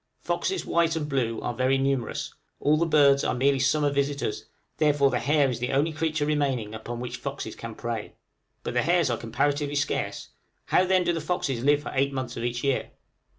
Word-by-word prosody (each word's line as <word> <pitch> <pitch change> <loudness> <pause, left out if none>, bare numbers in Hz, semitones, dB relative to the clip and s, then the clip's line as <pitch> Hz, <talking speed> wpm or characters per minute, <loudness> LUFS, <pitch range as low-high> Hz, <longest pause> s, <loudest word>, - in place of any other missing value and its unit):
Foxes, 385 - -1
white 165 -1 +2
and 155 -2 -2
blue, 125 -5 -1
are - - -2
very 130 +2 +2
numerous; 135 -3 -1 0.3
all 150 +1 +3
the 165 +2 +1
birds 140 -3 +5
are - - 0
merely 135 +2 +2
summer 145 +2 +2
visitors, 140 -4 -1 0.3
therefore 145 -3 +3
the 125 - 0
hare 145 +1 +3
is 125 -3 -3
the 125 - -2
only 145 +4 +1
creature 155 -1 -1
remaining 135 -8 0
upon 120 +2 -6
which 125 0 -5
foxes - - -5
can - - -8
prey; - - -5 0.5
but - - -3
the 125 - +2
hares 170 -4 +2
are 120 - 0
comparatively 145 +5 -1
scarce: 145 - -2 0.4
how - - +3
then 185 0 +3
do 175 - +1
the 165 - -2
foxes 135 -9 -2
live 145 +1 +3
for - - -5
eight 140 +1 +1
months 130 -2 -4
of 115 - -4
each 120 0 -2
year? 135 -2 0
140 Hz, 200 wpm, -26 LUFS, 125-150 Hz, 0.5 s, birds